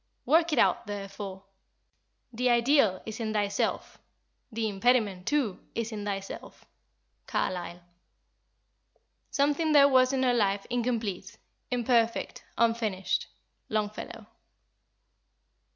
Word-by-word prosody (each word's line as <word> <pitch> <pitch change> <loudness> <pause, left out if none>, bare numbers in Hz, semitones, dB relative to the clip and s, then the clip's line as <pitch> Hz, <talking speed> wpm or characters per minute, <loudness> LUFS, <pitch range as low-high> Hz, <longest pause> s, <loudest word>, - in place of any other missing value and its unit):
Work 330 +1 +4
it 300 - 0
out 235 - +3
therefore. 195 -1 -6 0.9
The 250 +2 +1
Ideal 235 -5 +3
is 220 0 -6
in 220 -2 -2
thyself, 205 -1 -1 0.5
the 225 0 -1
impediment 205 -3 +1
too 275 -10 0 0.2
is 230 0 -2
in 210 -2 -5
thyself." 195 -1 -6 0.6
CARLYLE. 175 -1 -2 1.5
"Something 295 +3 +1
there 280 -1 +8
was 255 -1 +4
in 265 -1 0
her 250 -1 +3
life 200 -4 +1
incomplete, 230 -5 -2 0.3
imperfect, 235 -2 0
unfinished." 225 -4 0 0.4
LONGFELLOW. 215 +1 -3
225 Hz, 100 wpm, -28 LUFS, 200-250 Hz, 1.5 s, there